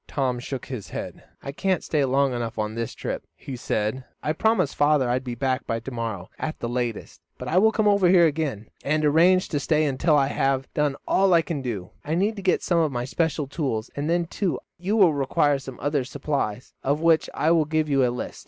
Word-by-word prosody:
Tom 130 -3 -1
shook 130 +1 -5
his 125 -7 -7
head. - - -7 0.2
"I 140 - -4
can't 180 +3 0
stay 150 -3 +1
long 135 0 +2
enough 120 -1 -4
on 110 0 -2
this 115 0 -4
trip," - - -4
he 135 - -7
said. 110 +1 -2 0.2
"I 150 - 0
promised 185 -4 +1
father 145 -3 +3
I 120 +1 +1
would 130 - -5
be 125 -2 -5
back 130 +1 -1
by 115 - -1
to 135 - -8
morrow 115 -6 -4
at 155 - -3
the 120 - -4
latest, 120 -2 -3 0.2
but - - -7
I 175 - +3
will 220 +3 +5
come 215 -1 +1
over 200 -3 +4
here 175 -2 +6
again, 145 -9 -2
and 155 +2 +1
arrange 175 +5 +4
to 145 - -1
stay 155 +2 +2
until 150 +2 +2
I 135 -1 +2
have 135 -1 0
done 150 -2 +1
all 190 -2 +4
I 165 - +4
can. 155 -5 -4 0.4
I 155 +2 -2
need 205 +5 +1
to - - -5
get 185 -1 +1
some 170 -2 +2
of 155 -3 +2
my 120 -1 -2
special 155 +2 -1
tools, 135 -6 -3
and 145 +2 -2
then, 170 0 +2
too, 180 +1 -2 0.2
you 195 +5 0
will 185 -7 +6
require 140 +1 +1
some 130 -1 -9
other 145 0 0
supplies, 130 -4 -3
of 140 +2 0
which 165 -1 +3
I 160 - +2
will 165 -2 +4
give 155 0 0
you 135 -2 +3
a 125 - +3
list. 120 0 -5
145 Hz, 230 wpm, -24 LUFS, 130-165 Hz, 0.4 s, here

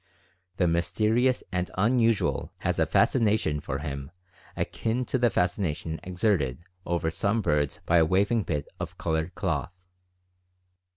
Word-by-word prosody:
The 90 - +3
mysterious 110 +9 +2
and 90 -1 -1
unusual 115 +1 +2
has - - 0
a - - +3
fascination 105 - +2
for 70 -1 -4
him 70 -1 -5 0.5
akin 120 +3 -1
to 130 - -1
the 120 -1 +4
fascination 90 -4 -1
exerted 90 - 0 0.2
over 85 -1 0
some 100 +7 0
birds 75 -3 0
by 85 - +4
a 80 - +5
waving 100 +7 +2
bit 75 -7 -3
of - - -6
colored 80 +1 -2
cloth. - - -1
90 Hz, 130 wpm, -27 LUFS, 80-110 Hz, 0.5 s, a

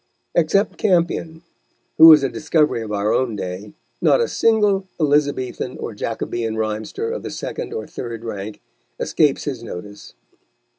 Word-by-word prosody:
Except 185 +5 +1
Campion, 170 -3 0 0.6
who 160 0 +11
is 150 -3 +7
a 135 - +1
discovery 150 -5 +1
of 110 -2 -6
our 105 0 0
own 125 -4 0
day, 95 +1 -6 0.3
not - - +4
a 470 - +2
single 210 -4 +2
Elizabethan 145 -4 0
or - - -5
Jacobean 115 +1 -3
rhymester 110 - -3
of 485 - -4
the - - -6
second - - -5
or 450 0 -4
third 115 -2 -7
rank 105 -1 -6 0.4
escapes 150 -4 +1
his 130 -5 -4
notice. 100 -2 -9
130 Hz, 145 wpm, -21 LUFS, 110-165 Hz, 0.6 s, who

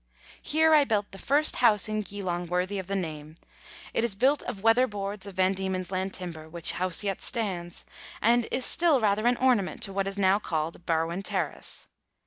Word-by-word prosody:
Here 315 +1 +3
I 300 -2 +7
built 210 -6 -1
the 195 - -11
first 295 +7 +2
house 220 -3 +4
in 215 0 -1
Geelong 185 -4 -4
worthy 180 +3 -1
of 185 - -7
the 200 - -2
name; 155 -4 -5 0.6
it - - 0
is 235 -5 -1
built 265 +7 +2
of 195 - -7
weatherboards 210 -4 +1
of 195 - -9
Van 190 +1 +2
Diemen's 190 -1 -3
Land 190 0 -2
timber, 165 -4 -8
which 170 +1 +2
house 185 +1 0
yet 195 -2 -2
stands, 185 -7 -3 0.3
and 235 +1 +3
is 255 - 0
still 335 -5 +4
rather 215 +1 +1
an 245 0 +3
ornament 245 -7 +1
to 195 - -2
what 195 0 -1
is 195 0 -3
now 195 0 +3
called 165 -2 -4
Barwon 165 +2 0
Terrace. 190 -7 -2
195 Hz, 190 wpm, -27 LUFS, 180-225 Hz, 0.6 s, I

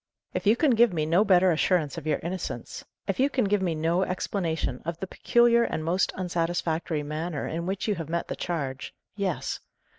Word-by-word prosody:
"If - - -2
you 215 - +6
can 290 +2 +3
give 235 -1 +5
me 155 -2 0
no 170 +6 +4
better 185 -3 +5
assurance 160 -2 +1
of 160 -2 -6
your 155 - +2
innocence 180 +2 -5 0.2
if - - -1
you 270 +2 +4
can 260 -5 +1
give 205 0 +2
me 175 -3 0
no 165 +3 +1
explanation 170 -7 -2
of 170 0 -4
the - - -3
peculiar 235 +4 +3
and 155 -8 -2
most 180 +3 +1
unsatisfactory 170 -3 -1
manner 155 +1 -3
in 170 +2 -3
which 190 +2 -2
you 210 - +2
have 165 -5 -6
met 170 +1 -1
the - - -4
charge 140 -6 -4 0.2
yes. 195 -5 -2
175 Hz, 200 wpm, -27 LUFS, 160-195 Hz, 0.2 s, you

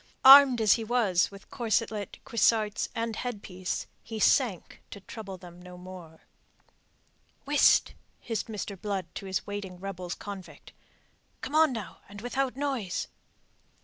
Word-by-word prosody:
Armed 270 -2 +10
as 215 -2 +6
he 230 - -1
was 215 -6 +2
with 200 0 -15
corselet, 220 -3 -2
cuissarts, 215 -1 +1
and 230 -1 -2
headpiece, 200 -6 -4 0.2
he 225 -1 -7
sank 225 - +1
to 200 - -9
trouble 195 -1 -9
them 175 -1 -13
no 180 0 -11
more. 180 -3 -11 1.2
"Whist!" 290 0 +4 0.3
hissed 225 -3 -4
Mr. 205 -3 -6
Blood 200 -3 -2
to 195 - -7
his 190 - -2
waiting 200 -3 -6
rebels 185 -2 -5
convict. 200 -3 -10 0.7
"Come 280 - -6
on, 315 -1 +5
now, 225 -5 -7
and 205 0 -10
without 255 +3 -2
noise." 260 - -2
205 Hz, 135 wpm, -28 LUFS, 185-235 Hz, 1.2 s, Armed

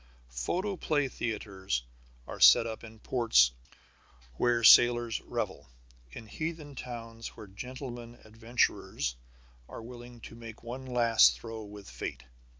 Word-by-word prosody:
Photoplay 155 - -1
theatres 95 - -3 0.4
are - - -8
set - - +8
up 110 0 -6
in 110 -1 -11
ports 110 - +3 0.8
where 120 - +1
sailors 120 0 +6
revel, - - -5 0.4
in 110 - -9
heathen 155 +4 -5
towns 115 -3 -8
where 110 - -9
gentlemen 120 +3 -8
adventurers 115 - -1 0.5
are - - -8
willing 120 0 -11
to 115 - -11
make 115 -1 -11
one 130 +3 -7
last 120 -3 +4
throw 115 -1 -7
with 105 -1 -11
fate. 65 0 -6
115 Hz, 120 wpm, -30 LUFS, 110-125 Hz, 0.8 s, set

